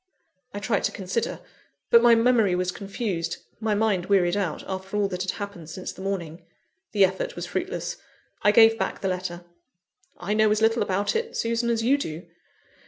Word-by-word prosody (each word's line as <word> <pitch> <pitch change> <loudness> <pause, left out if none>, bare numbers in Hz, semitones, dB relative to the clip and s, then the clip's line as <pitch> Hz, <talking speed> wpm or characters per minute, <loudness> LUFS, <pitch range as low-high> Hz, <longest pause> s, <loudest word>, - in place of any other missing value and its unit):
I - - -7
tried 205 +1 0
to - - 0
consider; 195 +4 -3 0.5
but 235 - +8
my 235 -1 +7
memory 230 -5 +3
was 180 0 0
confused, 195 -3 -3 0.2
my 220 -1 0
mind 205 -4 +1
wearied 185 -3 +3
out, 190 -6 -2
after 190 +1 -4
all 205 -1 +2
that 180 -1 -4
had 185 0 -1
happened 200 -6 -7
since 185 +3 -6
the - - -12
morning. 180 -4 -4 0.5
The 200 -2 +5
effort - - -3
was - - -4
fruitless: - - -3 0.4
I 205 - +5
gave 225 +1 +6
back - - -2
the 195 - -1
letter. 180 -2 -4 0.7
"I 195 +4 -2
know 215 0 +4
as 210 0 +2
little 225 +1 +3
about 200 - 0
it, 460 +1 -2
Susan, 230 - 0
as 230 -1 0
you 275 +5 +3
do." 165 - -5
205 Hz, 185 wpm, -25 LUFS, 185-225 Hz, 0.7 s, but